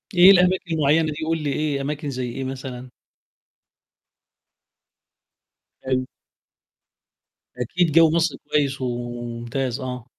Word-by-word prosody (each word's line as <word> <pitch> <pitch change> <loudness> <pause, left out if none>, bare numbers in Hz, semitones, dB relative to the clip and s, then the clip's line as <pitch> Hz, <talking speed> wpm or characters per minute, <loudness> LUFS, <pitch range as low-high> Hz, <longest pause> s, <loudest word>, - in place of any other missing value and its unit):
إيه 180 +2 +9
الأماكن 180 -2 +3
المعيّنة 155 +1 +2
دي، 150 +1 -5
قُل 165 0 +1
لي 145 -2 -1
إيه، 150 -2 -1
أماكن 145 +1 -4
زي 130 -2 -3
إيه 135 +3 -5
مثلًا؟ 130 -1 -7 2.9
حلو. 130 -1 0 1.5
أكيد 165 +8 0
جَوّ 165 +1 +6
مصر 165 0 +1 0.2
كويس 140 -2 +1
وممتاز، 120 +1 -4
آه. 125 -3 -6
135 Hz, 105 wpm, -23 LUFS, 125-160 Hz, 2.9 s, إيه